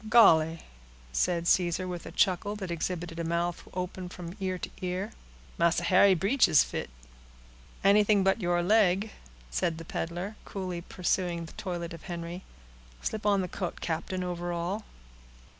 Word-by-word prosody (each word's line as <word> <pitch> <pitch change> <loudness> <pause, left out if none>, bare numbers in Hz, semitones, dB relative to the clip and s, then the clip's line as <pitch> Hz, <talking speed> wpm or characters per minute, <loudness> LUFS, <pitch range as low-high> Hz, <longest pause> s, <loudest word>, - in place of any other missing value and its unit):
"Golly!" 165 -8 +6 0.5
said 170 - +1
Caesar, 180 +1 +2
with 175 -1 -5
a - - -7
chuckle, 195 +2 +1
that 190 -4 -5
exhibited 170 0 -3
a - - -1
mouth 170 +1 -1
open 180 0 -4
from 175 0 -8
ear 185 -1 -1
to - - -6
ear, 185 +4 -2 0.5
"Massa 170 0 +3
Harry 185 +2 +6
breeches 195 - +4
fit." - - -4 0.9
"Anything 205 0 +5
but 195 +3 +2
your 175 -1 +1
leg," 205 +1 +3 0.4
said 160 - 0
the 165 - -8
peddler, 175 +7 -4
coolly 185 -3 -4
pursuing 175 -1 -1
the 160 - -12
toilet 175 -3 -4
of 165 - -9
Henry. 175 0 -5 0.6
"Slip 215 -1 -2
on 200 -1 +4
the 180 - -2
coat, 180 0 -4
captain, 175 +3 -2
over 175 -1 -3
all. 175 +5 -2
180 Hz, 150 wpm, -29 LUFS, 170-195 Hz, 0.9 s, Golly